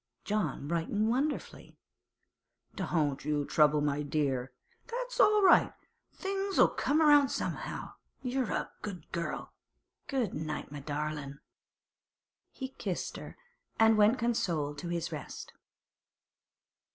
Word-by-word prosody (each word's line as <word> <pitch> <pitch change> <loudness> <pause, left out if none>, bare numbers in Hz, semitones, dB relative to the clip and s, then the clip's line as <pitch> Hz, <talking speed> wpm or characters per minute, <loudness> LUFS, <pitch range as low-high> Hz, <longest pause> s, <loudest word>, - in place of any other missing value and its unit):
John 190 -9 -1
brightened 170 +7 0
wonderfully. 285 +5 -2 1.0
'Don't 145 -5 0
you 150 0 0
trouble, 150 0 +4
my 145 0 0
dear. 140 -4 -1 0.4
That's - - -4
all 420 -1 +6
right. 365 - +6 0.4
Things'll 390 0 +2
come 300 +3 +1
round 290 -3 +6
somehow. - - -4 0.3
You're 255 -2 -1
a - - -2
good 185 -7 -7
girl. 170 -2 -4 0.5
Good 255 -8 -1
night, 150 -2 -4
my 145 - -6
darlin'!' 145 -1 -4 1.1
He 265 -1 -6
kissed - - -4
her, - - -9 0.4
and 225 0 +6
went 215 +4 +5
consoled 170 - -1
to 175 - -5
his 170 0 -2
rest. 150 -3 -7
170 Hz, 115 wpm, -31 LUFS, -, 1.1 s, all